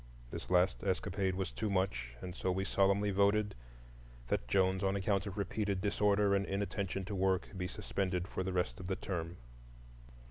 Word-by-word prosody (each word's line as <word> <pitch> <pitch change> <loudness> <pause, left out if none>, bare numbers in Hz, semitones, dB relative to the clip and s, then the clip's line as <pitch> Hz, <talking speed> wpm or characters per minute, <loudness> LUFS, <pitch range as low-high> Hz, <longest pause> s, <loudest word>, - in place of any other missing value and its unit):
This - - -6
last 90 +1 +3
escapade 95 0 0
was 95 -1 -2
too 110 0 -2
much, 65 -11 -1
and 90 -1 -5
so 95 - 0
we 95 +2 -1
solemnly 100 +1 +3
voted 100 +1 +3 0.8
"that 60 - 0
Jones, 95 +6 +2
on 95 0 +2
account 100 +1 +1
of 100 +1 -6
repeated 100 0 -1
disorder 100 0 +3
and 100 0 +3
inattention 100 -1 -2
to 100 - -5
work, 95 0 +1
be 90 -1 -2
suspended 90 -1 -2
for 95 - -3
the 95 - -2
rest 90 -1 -1
of 90 - -6
the 95 - 0
term." 85 -2 -4
95 Hz, 175 wpm, -34 LUFS, 95-100 Hz, 0.8 s, last